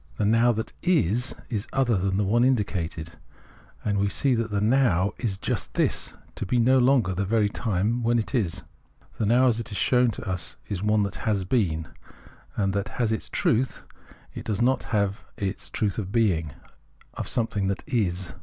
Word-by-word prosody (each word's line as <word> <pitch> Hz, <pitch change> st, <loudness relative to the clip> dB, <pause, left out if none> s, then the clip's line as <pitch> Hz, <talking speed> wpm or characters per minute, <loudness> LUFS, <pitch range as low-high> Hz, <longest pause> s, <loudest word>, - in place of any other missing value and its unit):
The 105 Hz, -, +1 dB
Now 115 Hz, +3 st, +4 dB
that 110 Hz, 0 st, -4 dB
is, 130 Hz, -, +1 dB, 0.2 s
is 105 Hz, -3 st, -2 dB
other 130 Hz, -4 st, +2 dB
than 95 Hz, 0 st, 0 dB
the 105 Hz, -, +2 dB
one 115 Hz, +5 st, +3 dB
indicated, 95 Hz, -10 st, -1 dB, 0.7 s
and 100 Hz, -1 st, +1 dB
we 100 Hz, 0 st, +2 dB
see 135 Hz, +5 st, +2 dB
that 115 Hz, -1 st, 0 dB
the 105 Hz, -1 st, 0 dB
Now 105 Hz, -5 st, +2 dB
is 110 Hz, -6 st, -1 dB
just -, -, -3 dB
this -, -, 0 dB
— -, -, -29 dB
to -, -, -3 dB
be 120 Hz, -, 0 dB
no 130 Hz, +3 st, +4 dB
longer 125 Hz, -7 st, +3 dB
the 95 Hz, +3 st, -1 dB
very 105 Hz, +1 st, +2 dB
time 110 Hz, +2 st, -1 dB
when 120 Hz, +1 st, +2 dB
it 115 Hz, -, -2 dB
is. 100 Hz, -, -1 dB, 0.6 s
The 105 Hz, -, +1 dB
Now 125 Hz, +4 st, +4 dB
as 120 Hz, -3 st, +3 dB
it 115 Hz, -1 st, -5 dB
is 100 Hz, -, -4 dB
shown 125 Hz, +4 st, +3 dB
to 105 Hz, -, -6 dB
us 90 Hz, -2 st, -2 dB
is 95 Hz, -3 st, -3 dB
one 105 Hz, 0 st, +2 dB
that 100 Hz, 0 st, -4 dB
has 100 Hz, -4 st, -1 dB
been, 85 Hz, -8 st, 0 dB, 0.7 s
and 95 Hz, -1 st, 0 dB
that 100 Hz, +4 st, -3 dB
is 115 Hz, -3 st, +2 dB
its 110 Hz, -, -3 dB
truth; 125 Hz, +3 st, 0 dB, 0.5 s
it -, -, -7 dB
does 105 Hz, -3 st, -1 dB
not 130 Hz, +2 st, +2 dB
have 100 Hz, -2 st, -1 dB
the 100 Hz, -1 st, -2 dB, 0.2 s
truth 105 Hz, -1 st, -1 dB
of 95 Hz, -3 st, -5 dB
being, 90 Hz, -10 st, +1 dB, 0.6 s
of -, -, -5 dB
something 105 Hz, -4 st, -1 dB
that 100 Hz, +1 st, -2 dB
is. 95 Hz, -, -1 dB
105 Hz, 195 wpm, -26 LUFS, 95-120 Hz, 0.7 s, Now